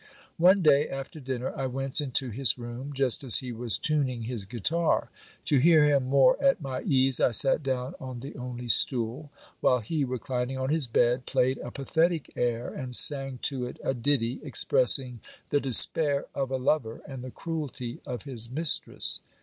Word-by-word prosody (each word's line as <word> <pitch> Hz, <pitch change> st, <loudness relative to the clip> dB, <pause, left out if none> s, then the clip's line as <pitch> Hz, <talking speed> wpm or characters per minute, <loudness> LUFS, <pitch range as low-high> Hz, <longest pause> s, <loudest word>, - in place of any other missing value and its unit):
One 185 Hz, +3 st, +4 dB
day 145 Hz, -1 st, +3 dB
after 135 Hz, +3 st, -8 dB
dinner 130 Hz, -2 st, -5 dB
I 135 Hz, -, -3 dB
went 135 Hz, +3 st, -4 dB
into 130 Hz, -2 st, -1 dB
his 130 Hz, +4 st, +1 dB
room, 120 Hz, +3 st, -8 dB
just 135 Hz, -2 st, +1 dB
as 125 Hz, -4 st, +5 dB
he 125 Hz, -2 st, -6 dB
was 115 Hz, -1 st, 0 dB
tuning 135 Hz, -6 st, -1 dB
his 115 Hz, -3 st, -4 dB
guitar. 150 Hz, -, -1 dB, 0.3 s
To 145 Hz, -, +3 dB
hear 160 Hz, +2 st, +5 dB
him 140 Hz, -3 st, +2 dB
more 140 Hz, -, +3 dB
at 275 Hz, -5 st, +3 dB
my 135 Hz, -4 st, -6 dB
ease, 130 Hz, -1 st, +2 dB
I -, -, +4 dB
sat 135 Hz, +5 st, +4 dB
down 130 Hz, -2 st, -4 dB
on 130 Hz, -2 st, -8 dB
the 135 Hz, -, -9 dB
only 125 Hz, -2 st, -7 dB
stool; 120 Hz, +4 st, +2 dB, 0.3 s
while 125 Hz, -, +2 dB
he, 140 Hz, +7 st, -3 dB
reclin 125 Hz, -1 st, -4 dB
ing 135 Hz, -, -6 dB
on 130 Hz, +1 st, -3 dB
his 155 Hz, -4 st, 0 dB
bed, 120 Hz, +2 st, 0 dB
played 130 Hz, +1 st, 0 dB
a -, -, -7 dB
pathetic 160 Hz, +5 st, -2 dB
air, 120 Hz, -1 st, -2 dB
and 130 Hz, -4 st, -3 dB
sang 135 Hz, -2 st, +5 dB
to 130 Hz, -3 st, +1 dB
it 125 Hz, -, -10 dB
a -, -, -1 dB
ditty, 125 Hz, -1 st, -2 dB
expressing 130 Hz, -3 st, +3 dB, 0.3 s
the 145 Hz, -, +1 dB
despair 140 Hz, +2 st, +3 dB
of 135 Hz, -2 st, -3 dB
a 130 Hz, -, -2 dB
lover 125 Hz, -3 st, -2 dB
and 135 Hz, -3 st, -9 dB
the 130 Hz, -, -7 dB
cruelty 140 Hz, -6 st, -6 dB
of 125 Hz, -3 st, -7 dB
his 120 Hz, -5 st, -6 dB
mistress. 155 Hz, +4 st, +1 dB
130 Hz, 180 wpm, -26 LUFS, 125-145 Hz, 0.3 s, as